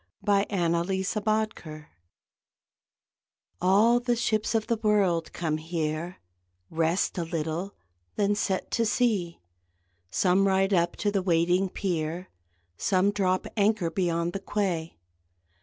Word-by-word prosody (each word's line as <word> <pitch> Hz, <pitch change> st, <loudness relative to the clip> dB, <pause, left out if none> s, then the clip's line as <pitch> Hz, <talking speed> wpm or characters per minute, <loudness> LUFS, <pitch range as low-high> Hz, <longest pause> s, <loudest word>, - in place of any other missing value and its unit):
IN 200 Hz, 0 st, +4 dB
AN 175 Hz, -4 st, +1 dB
ORIENTAL 190 Hz, +4 st, -1 dB
HARBOUR 195 Hz, -9 st, -2 dB, 1.7 s
All 210 Hz, +6 st, +4 dB
the 245 Hz, 0 st, 0 dB
ships 225 Hz, -1 st, 0 dB
of 220 Hz, -1 st, +1 dB
the 230 Hz, -, 0 dB
world 200 Hz, -6 st, +1 dB
come 160 Hz, -3 st, -2 dB
here, 160 Hz, +1 st, -3 dB, 0.5 s
Rest 165 Hz, +3 st, 0 dB
a -, -, 0 dB
little, 165 Hz, +3 st, -3 dB, 0.4 s
then 205 Hz, 0 st, +2 dB
set 195 Hz, -2 st, -2 dB
to 230 Hz, -, +1 dB
sea; 205 Hz, -8 st, 0 dB, 0.7 s
Some 190 Hz, -, +2 dB
ride 195 Hz, +1 st, +2 dB
up 170 Hz, -2 st, +2 dB
to 205 Hz, -, -1 dB
the 200 Hz, -1 st, 0 dB
waiting 180 Hz, +1 st, +2 dB
pier, 175 Hz, -1 st, -3 dB, 0.5 s
Some 195 Hz, +1 st, +2 dB
drop 185 Hz, -2 st, 0 dB
anchor 205 Hz, -5 st, +1 dB
beyond 170 Hz, -1 st, -1 dB
the 195 Hz, -, -3 dB
quay. 185 Hz, -6 st, -2 dB
185 Hz, 125 wpm, -27 LUFS, 170-205 Hz, 1.7 s, IN